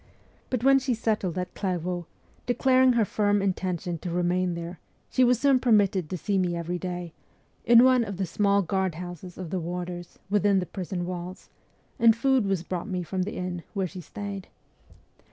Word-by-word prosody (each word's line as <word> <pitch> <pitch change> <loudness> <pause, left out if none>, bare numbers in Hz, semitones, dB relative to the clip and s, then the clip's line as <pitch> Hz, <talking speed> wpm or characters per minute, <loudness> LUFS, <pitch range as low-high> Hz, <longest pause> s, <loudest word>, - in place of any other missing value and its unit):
But 250 -3 -1
when 270 0 +6
she 260 -2 -1
settled 215 -6 -1
at 180 0 -3
Clairvaux, 180 -3 -3 0.4
declaring 255 +1 +4
her 230 -3 +3
firm 205 +1 +1
intention 180 -3 -2
to 175 - -5
remain 175 +1 0
there, 170 +1 -6 0.3
she 255 - +3
was 245 -1 +4
soon 275 -2 +4
permitted 200 -8 +3
to 185 - -3
see 195 +4 0
me 175 -2 0
every 170 +1 -3
day, 175 -2 -5 0.5
in 235 +1 +8
one 255 -2 +5
of 200 -4 -5
the 190 - 0
small 200 +3 +2
guard 190 -1 -1
houses 175 +1 -8
of 180 -3 -6
the 185 - -1
warders, 175 +1 -5
within 205 0 +3
the 185 - 0
prison 180 -1 -4
walls, 180 +1 -7 0.5
and 230 -2 +6
food 255 -2 +2
was 190 -4 0
brought 180 +4 -4
me 180 -2 -2
from 185 +3 -3
the 195 +3 -3
inn 180 -1 -4
where 195 -1 0
she 185 +1 -7
stayed. 200 +3 -7
185 Hz, 185 wpm, -27 LUFS, 175-210 Hz, 0.5 s, in